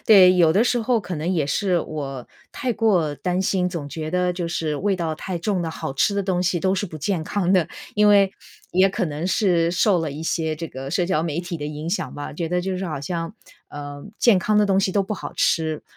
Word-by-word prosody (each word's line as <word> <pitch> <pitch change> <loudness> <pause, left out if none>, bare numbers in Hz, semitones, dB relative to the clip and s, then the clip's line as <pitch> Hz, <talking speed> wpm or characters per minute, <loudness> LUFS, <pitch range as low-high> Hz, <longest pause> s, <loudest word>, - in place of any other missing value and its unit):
对， 185 -4 +8
有 170 -3 +5
的 205 +8 +3
时 245 0 +2
候 235 +1 +2
可 185 -4 -5
能 160 +4 -2
也 160 -6 +1
是 180 +3 +1
我 135 -5 -5 0.2
太 250 -2 -2
过 180 -10 +2
担 180 +6 -1
心， 185 -1 +1
总 170 -5 -5
觉 155 +1 -5
得 180 0 +1
就 175 -1 -3
是 155 -3 -2
味 195 +3 0
道 165 -3 -2
太 180 +3 -5
重 190 +1 -1
的 165 -1 -2
好 135 - -5
吃 200 +9 +2
的 200 - 0
东 185 -2 0
西 175 -1 +1
都 190 +3 +1
是 200 +2 -1
不 160 - -9
健 160 +2 -1
康 185 +1 0
的。 175 -4 +3 0.3
因 210 0 +4
为 200 -2 +5 0.4
也 185 +2 +4
可 195 0 -1
能 155 +2 -3
是 175 -4 +2
受 180 +1 +3
了 160 -3 -2
一 150 +3 -6
些 160 -1 -1
这 165 0 -5
个 135 +1 -7
社 180 +1 +1
交 165 -3 0
媒 165 -1 -2
体 175 -1 -4
的 145 - -4
影 150 +2 -5
响 210 - -2
吧， 145 - -6
觉 165 +2 -3
得 180 0 0
就 190 -1 -2
是 190 - -3
好 155 -4 -4
像， 165 +6 -4 0.3
呃， 145 -1 -8 0.2
健 230 -6 +5
康 210 +4 +1
的 210 - +5
东 195 -1 +2
西 190 - +1
都 200 +1 +2
不 205 +3 -4
好 - - -6
吃， 160 -2 +1
175 Hz, 265 characters per minute, -23 LUFS, 155-195 Hz, 0.4 s, 对